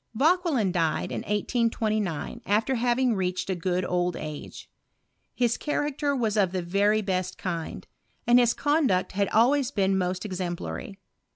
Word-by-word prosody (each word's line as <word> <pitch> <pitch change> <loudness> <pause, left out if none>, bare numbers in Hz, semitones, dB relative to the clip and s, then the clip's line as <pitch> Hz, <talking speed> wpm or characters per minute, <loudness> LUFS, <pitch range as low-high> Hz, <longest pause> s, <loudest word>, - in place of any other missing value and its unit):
Vauquelin 300 - +2
died 165 -3 0
in - - -2
1829, 215 -5 -1
^fter 220 +6 +1
having 245 +1 +2
reached 185 -1 -2
a - - 0
good 180 +1 -1
old 180 -1 0
age. 150 -1 -7 0.7
His 240 -2 +1
character 290 -1 -1
was 225 -5 0
of 190 -4 +2
the 185 -2 -1
very 205 +4 +2
best 185 -2 -2
kind, 170 -3 -4 0.4
and 240 +1 +6
his 240 -1 +3
conduct 290 - +1
had 200 +1 0
always 250 +4 +3
been 195 -6 +1
most 185 +1 -1
ex 190 -3 -4
emplary. 180 +2 -4
205 Hz, 150 wpm, -26 LUFS, 185-245 Hz, 0.7 s, and